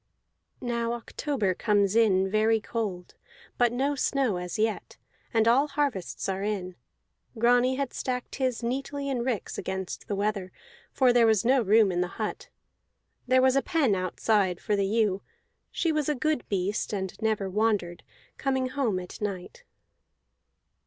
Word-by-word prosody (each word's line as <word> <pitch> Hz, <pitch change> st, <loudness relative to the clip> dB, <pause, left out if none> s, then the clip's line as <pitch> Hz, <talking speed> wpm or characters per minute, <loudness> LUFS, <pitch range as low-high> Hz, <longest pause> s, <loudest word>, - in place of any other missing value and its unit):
Now 235 Hz, -1 st, -1 dB
October 240 Hz, -3 st, -2 dB
comes 205 Hz, 0 st, +1 dB
in 195 Hz, -4 st, +4 dB
very 215 Hz, +3 st, +2 dB
cold, 205 Hz, -6 st, -4 dB, 0.5 s
but 240 Hz, -1 st, +4 dB
no 270 Hz, +4 st, 0 dB
snow 270 Hz, -7 st, 0 dB
as 180 Hz, -1 st, -5 dB
yet; 220 Hz, 0 st, -2 dB, 0.3 s
and 225 Hz, -2 st, +2 dB
all 265 Hz, +5 st, +4 dB
harvests 280 Hz, -10 st, -2 dB
are 190 Hz, 0 st, -2 dB
in. 195 Hz, -3 st, -3 dB, 0.6 s
Grani 245 Hz, +3 st, +3 dB
had 275 Hz, -1 st, -3 dB
stacked 250 Hz, -1 st, -4 dB
his 255 Hz, -3 st, -1 dB
neatly 275 Hz, +3 st, -3 dB
in 255 Hz, -3 st, -1 dB
ricks 240 Hz, -5 st, -3 dB
against 190 Hz, -1 st, -5 dB
the 205 Hz, -, -2 dB
weather, 200 Hz, -2 st, -2 dB, 0.4 s
for 255 Hz, -2 st, +3 dB
there 235 Hz, -2 st, +5 dB
was 220 Hz, -2 st, +3 dB
no 260 Hz, +1 st, +4 dB
room 215 Hz, -1 st, +4 dB
in 175 Hz, 0 st, 0 dB
the 180 Hz, -, 0 dB
hut. 215 Hz, -2 st, -4 dB, 0.8 s
There 255 Hz, +1 st, +4 dB
was 260 Hz, 0 st, +4 dB
a 275 Hz, -, +4 dB
pen 295 Hz, -, +1 dB
outside 185 Hz, 0 st, +1 dB
for 210 Hz, -, 0 dB
the 200 Hz, -1 st, +1 dB
ewe; 205 Hz, -2 st, +1 dB, 0.5 s
she 335 Hz, -, 0 dB
was 305 Hz, -2 st, 0 dB
a 300 Hz, -, +1 dB
good 305 Hz, +1 st, -1 dB
beast 200 Hz, +2 st, -1 dB
and 190 Hz, -2 st, -3 dB
never 215 Hz, -3 st, 0 dB
wandered, 190 Hz, -4 st, 0 dB, 0.4 s
coming 265 Hz, -2 st, 0 dB
home 255 Hz, -8 st, 0 dB
at 180 Hz, +3 st, -9 dB
night. 205 Hz, -, -5 dB
225 Hz, 155 wpm, -27 LUFS, 195-255 Hz, 0.8 s, there